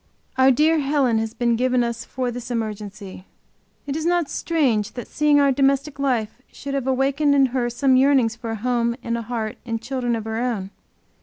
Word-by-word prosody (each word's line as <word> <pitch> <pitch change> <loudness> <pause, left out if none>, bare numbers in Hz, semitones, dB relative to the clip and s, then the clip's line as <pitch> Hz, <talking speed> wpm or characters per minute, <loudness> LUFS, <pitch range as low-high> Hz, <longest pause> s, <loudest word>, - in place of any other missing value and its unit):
Our 260 0 +5
dear 310 +5 +3
Helen 275 -5 +1
has 225 0 -4
been 235 -1 +1
given 250 +1 +1
us 235 -1 -3
for 255 -1 -3
this 245 0 -7
emergency. 210 -4 -5 0.6
Is 290 +2 -3
it 340 - +1
not 350 -4 0
strange 250 -11 0
that 245 - -7
seeing 295 -1 +3
our 280 -1 +4
domestic 275 +1 +1
life 250 -4 -1
should 280 0 -7
have 270 -2 -2
awakened 275 +2 +2
in 275 -1 +5
her 245 -2 0
some 260 +2 +2
yearnings 260 -4 +3
for 235 0 -7
a 225 - -2
home 235 +1 0
and 235 -1 -2
a 235 - -3
heart 225 -2 -4
and 230 -2 -3
children 245 0 -2
of 225 - -4
her 220 0 -3
own. 220 -6 -2
250 Hz, 200 wpm, -22 LUFS, 230-275 Hz, 0.6 s, Our